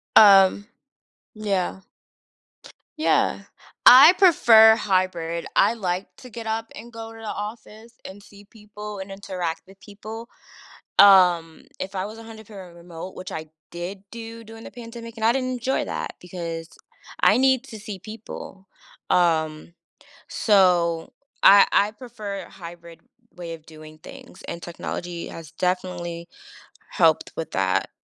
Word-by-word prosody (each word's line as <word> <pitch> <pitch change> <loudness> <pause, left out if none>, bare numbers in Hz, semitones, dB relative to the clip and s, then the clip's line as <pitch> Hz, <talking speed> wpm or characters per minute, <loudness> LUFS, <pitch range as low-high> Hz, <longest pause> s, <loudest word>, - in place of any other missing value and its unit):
Um. 200 -1 +7 0.7
Yeah. 200 -4 -2 1.2
Yeah. 310 - +1 0.4
I 275 +7 +10
prefer 225 - +7
hybrid, 180 -5 -1
I - - +4
like 185 -4 -3
to 255 - -12
get 230 -1 -8
up 225 +1 -3
and 235 +2 -12
go 225 0 -8
to 225 - -13
the 225 - -10
office 215 +2 -8
and 200 +2 -10
see 205 0 -17
people 210 -1 -10
and 190 +1 -8
interact 185 -4 -5
with 195 0 -17
people. 220 +3 -10 0.7
Um, 180 -5 +5 0.2
if 195 +1 -6
I 185 0 -2
was 215 +2 -9
100% 220 -5 -12
remote, 170 +1 -10
which 185 - -8
I 160 - -5 0.3
did 180 +3 -7
do 230 0 -9
during 225 +1 -12
the - - -10
pandemic, 230 -1 -10
and 220 -1 -3
I 230 - +5
didn't 255 0 -2
enjoy 255 +1 -2
that, - - -5
because 170 -2 -7 0.5
I - - +5
need 265 -1 +3
to 220 -5 -10
see 205 -2 -8
people. 210 -2 -10 0.4
Um, 160 -2 +1 0.6
so 175 -5 +2 0.3
I 200 0 +8
I 205 +1 +3
prefer 210 -4 -8
a - - -15
hybrid 170 -1 -12 0.3
way 170 -2 -7
of 160 -1 -19
doing 155 -1 -14
things, 265 - -14
and 170 - -6
technology 175 0 -6
has 165 -2 -10
definitely 175 -2 -3 0.6
helped - - +2
with - - -5
that. - - 0
200 Hz, 140 wpm, -23 LUFS, 175-225 Hz, 1.2 s, I